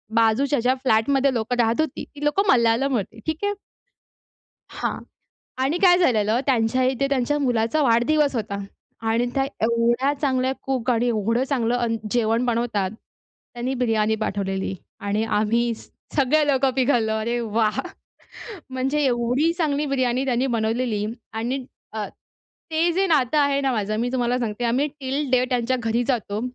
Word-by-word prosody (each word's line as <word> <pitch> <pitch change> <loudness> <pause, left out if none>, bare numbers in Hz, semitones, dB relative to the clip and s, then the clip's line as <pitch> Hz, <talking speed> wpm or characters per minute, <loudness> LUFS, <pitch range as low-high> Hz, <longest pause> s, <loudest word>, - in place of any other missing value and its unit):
बाजूच्या 230 +5 +3
ज्या 250 +2 +2
फ्लॅटमध्ये 265 +4 +2
लोकं 235 +1 -1
राहत 230 +5 +2
होती, 310 -4 -3
ती 290 0 -12
लोकं 340 +7 +2
मल्याळम 235 +3 +3
होती. 220 +1 -4
ठीक 315 0 -1
आहे? 410 0 +1 1.2
हां - - -3 0.7
आणि 315 +6 0
काय 355 -1 +6
झालेलं 225 - +2
त्यांच्या 255 -1 +2
इथे 260 +1 +1
त्यांच्या 275 +2 0
मुलाचा 245 +2 +1
वाढदिवस 275 +4 +3
होता 205 -2 -3 0.5
आणि 230 +2 +1
त्या 270 0 +2 0.2
एवढ्या 235 +4 +2
चांगल्या 260 -2 +1
कूक 260 -2 -1
आणि 240 0 +2
एवढं 230 +3 +1
चांगलं 240 -3 +1
अन् 235 -2 0 0.2
जेवण 230 0 +1
बनवतात. 230 -5 0 0.6
त्यांनी 245 +2 -2
बिर्याणी 220 -3 +1
पाठवलेली 195 -1 -2 0.3
आणि 205 +2 -1
आम्ही 225 +2 +1
स - - -15 0.3
सगळे 295 +2 +3
लोकं 270 -1 +2
पिघललो. 245 -4 +2
अरे 235 +2 -1
वाह! 220 -1 0 0.9
म्हणजे 265 +3 -1
एवढी 250 +5 +1
चांगली 295 -2 0
बिर्याणी 260 -1 0
त्यांनी 255 0 +1
बनवलेली 225 -2 -1 0.3
आणि 245 +4 -3 0.3
अ, 215 -2 -3 0.6
ते 325 +2 +2
जे 385 +3 +1
नातं 300 -4 +2
आहे 280 -1 +2
ना 270 -2 0
माझं 215 -1 -1
मी 245 - -1
तुम्हाला 245 -1 0
सांगते 235 0 -3
आम्ही 255 +5 +1
टिल 270 +1 -2
डे 255 -1 +3
त्यांच्या 250 +1 +1
घरी 230 +2 0
जातो. 215 -5 -1
245 Hz, 150 wpm, -23 LUFS, 225-275 Hz, 1.2 s, काय